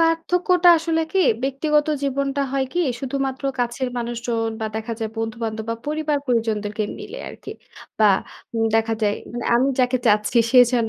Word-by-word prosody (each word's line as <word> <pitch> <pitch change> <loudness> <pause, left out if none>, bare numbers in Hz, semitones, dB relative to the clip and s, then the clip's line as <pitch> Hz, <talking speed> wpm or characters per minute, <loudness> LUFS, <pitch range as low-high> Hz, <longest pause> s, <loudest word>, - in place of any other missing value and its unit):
পার্থক্যটা 350 +2 +3
আসলে 325 0 0
কি, 385 - +2 0.2
ব্যক্তিগত 295 +3 +1 0.2
জীবনটা 280 0 0
হয় 270 -1 +1
কি 355 - 0 0.2
শুধুমাত্র 270 0 -3
কাছের 245 +2 -1
মানুষজন 235 -1 -2
বা 220 - -1
দেখা 220 +1 -4
যায় 220 -2 -3
বন্ধু-বান্ধব 225 -1 -3
বা - - 0
পরিবার-পরিজনদেরকে 240 -9 -1 0.2
মিলে 415 +4 -8
আরকি। - - -10 0.5
বা 215 -2 +6 0.4
উম 225 0 +1
দেখা 225 0 +1
যায় 205 -1 +2
বা - - -13
মানে 240 0 -4
আমি 255 +3 +3
যাকে 250 0 +2
চাচ্ছি 210 +2 +3
সে 255 - +6
যেন 235 -3 +2
250 Hz, 160 wpm, -22 LUFS, 225-290 Hz, 0.5 s, বা